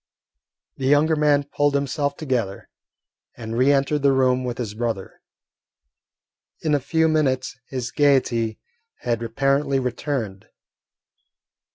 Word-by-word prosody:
The 130 - -2
younger 150 +3 +4
man 150 -1 +3
pulled 145 0 0
himself 140 +1 -1
together, 125 -10 -3 0.7
and 115 -1 -5
re 130 +4 +4
entered 140 +1 +1
the 140 -1 +4
room 130 -1 +2
with 125 -2 -4
his 115 -4 -4
brother. 110 -3 -4 1.4
In 155 -2 0
a 145 - +3
few 160 +4 +1
minutes 130 -5 0
his 130 -2 -4
gaiety 125 -6 +2 0.4
had 120 -1 -1
apparently 135 +4 +1
returned. 125 -5 -3
135 Hz, 115 wpm, -23 LUFS, 120-145 Hz, 1.4 s, younger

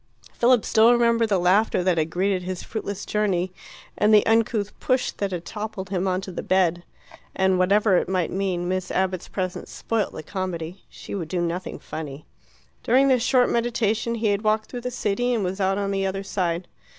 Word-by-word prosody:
Philip 240 -1 +3
still 225 +2 +5
remembered 235 -1 +3
the 200 - +3
laughter 185 +2 +2
that 180 -2 +2
had 155 0 0
greeted 185 +2 0
his 180 0 -5
fruitless 205 -3 -5
journey, 190 -4 0 0.4
and 210 +1 +3
the 210 -1 +6
uncouth 225 -2 +1
push 255 -1 +1
that 200 - -3
had 175 -2 -4
toppled 210 -3 -6
him 190 0 0
on 185 0 0
to 190 - -7
the - - -5
bed. 175 -2 +2 0.5
And 190 -1 +2
whatever 200 +1 +4
it - - -1
might 185 -3 0
mean, 185 -2 -1
Miss 185 0 -2
Abbott's 185 -1 -1
presence 185 -2 -4
spoilt 225 -2 -2
the - - -7
comedy: 185 -1 -5
she - - -10
would 180 -5 -3
do 180 +2 -2
nothing 175 +1 -3
funny. 150 -2 -7 0.6
During 265 +4 +4
this 255 -2 +3
short 250 +1 +3
meditation 235 -1 0
he 220 -2 0
had 200 0 +1
walked 215 0 0
through 245 - -5
the 250 - -3
city, 245 +1 0
and 215 - -1
was 190 +2 -3
out 195 +1 +1
on 200 -1 -1
the 195 -1 0
other 195 +1 -3
side. 180 -3 -2
195 Hz, 200 wpm, -24 LUFS, 185-220 Hz, 0.6 s, the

